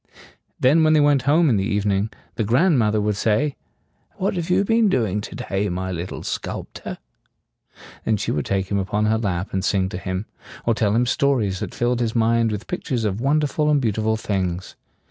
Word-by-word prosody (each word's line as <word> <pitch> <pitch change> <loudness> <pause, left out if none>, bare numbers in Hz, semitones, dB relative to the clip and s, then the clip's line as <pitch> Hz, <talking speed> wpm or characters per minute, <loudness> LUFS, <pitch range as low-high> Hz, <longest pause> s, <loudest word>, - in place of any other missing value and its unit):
Then 150 +6 +4
when 155 0 +4
they 155 - +5
went 145 -2 +4
home 160 +3 +5
in 120 -7 +3
the 95 - 0
evening, 100 0 0 0.2
the 115 - -1
grand 130 - +3
moth 105 -2 +2
er 105 - +2
would 105 0 0
say, 115 +8 +1 0.6
"What 195 - -1
have 175 -1 -3
you 185 +2 +3
been 225 0 +3
doing 105 - 0
to - - -8
day, 100 +1 -2
my 95 +1 -3
little 90 +1 -5
sculp - - -5
tor?" - - -7 1.1
And 110 -2 +1
she - - -1
would 75 - -2
take 95 0 -1
him 100 - +1
upon 105 +2 0
her 110 +1 +2
lap 95 -3 -2
and 95 -1 -1
sing 95 -1 +1
to 90 - -5
him, 95 +2 -3 0.4
or 115 - +3
tell 105 -2 +1
him 120 +2 +3
stories 120 -8 +1
that - - -5
filled 120 0 0
his 115 -1 -1
mind 115 0 +2
with 105 0 -4
pictures 130 -10 -2
of 105 +1 -1
wonderful 150 +2 +1
and 150 -1 +4
beautiful 110 -2 0
things. 95 -4 -3
110 Hz, 205 wpm, -22 LUFS, 100-140 Hz, 1.1 s, they